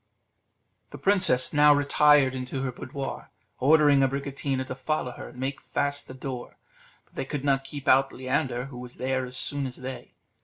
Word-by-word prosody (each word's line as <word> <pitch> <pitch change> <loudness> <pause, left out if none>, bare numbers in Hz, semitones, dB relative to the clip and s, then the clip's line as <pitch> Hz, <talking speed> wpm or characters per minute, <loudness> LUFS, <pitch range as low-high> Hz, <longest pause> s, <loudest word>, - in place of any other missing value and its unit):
The - - -9
princess 185 -10 +2
now 150 0 +6
retired 145 -1 +4
into 130 +1 -4
her 130 - -2
boudoir, 135 +2 -6 0.3
ordering 145 0 +5
Abricotina 135 0 -1
to 130 - -5
follow 130 0 -2
her - - -9
and 125 - -13
make 135 +1 -3
fast 145 0 -1
the 130 - -9
door; 130 -2 -7 0.5
but - - -34
they - - -3
could 140 0 -4
not 135 -1 +2
keep 140 +1 -8
out 135 +1 +5
Leander, 130 -1 -2
who 130 -3 -9
was 125 0 -9
there 130 0 -1
as 125 +1 -5
soon 140 +1 -1
as 125 - -8
they. 130 0 -8
135 Hz, 180 wpm, -26 LUFS, 130-145 Hz, 0.5 s, now